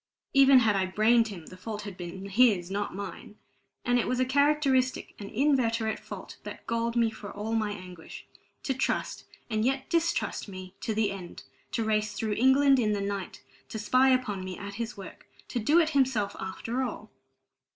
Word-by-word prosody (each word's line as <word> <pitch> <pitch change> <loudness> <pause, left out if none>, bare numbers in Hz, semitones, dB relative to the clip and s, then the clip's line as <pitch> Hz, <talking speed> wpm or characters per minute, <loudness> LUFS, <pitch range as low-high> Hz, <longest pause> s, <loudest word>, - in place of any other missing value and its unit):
Even 275 -1 +7
had 215 -3 +3
I 190 -1 +1
brained 225 +4 +4
him, 185 -7 -8
the 185 - -11
fault 210 +2 -6
had 200 -3 -7
been 180 +2 -7
his, 200 -4 +3
not 205 -1 -2
mine. 200 +1 -7 0.5
And 245 0 +3
it - - 0
was 255 - 0
a 255 - +3
characteristic, 275 -1 +2
an 200 -1 -7
inveterate 230 -4 +1
fault, - - -9
that - - -9
galled 230 0 -1
me 230 -2 +3
for 215 -2 -9
all 210 +2 -4
my 220 -2 +1
anguish: 180 -4 -9 0.4
to 270 - 0
trust 260 - -2 0.2
and 220 -2 0
yet 265 +2 -1
distrust 335 -7 0
me 185 -1 -9
to 220 - -2
the 210 -2 +1
end, 185 -3 -8 0.3
to 230 - 0
race 215 -1 0
through 215 0 -2
England 265 +4 +5
in 215 -3 +2
the 205 - -1
night, 200 -2 -4 0.3
to - - -5
spy 255 +5 +4
upon 250 -7 +1
me 185 -1 -6
at 200 0 -7
his 230 +2 -5
work 195 - -11 0.2
to 245 - -2
do 295 +10 +4
it 320 -2 +3
himself 260 -9 +1
after 230 +6 -3
all! 255 - -5
220 Hz, 190 wpm, -28 LUFS, 200-255 Hz, 0.5 s, Even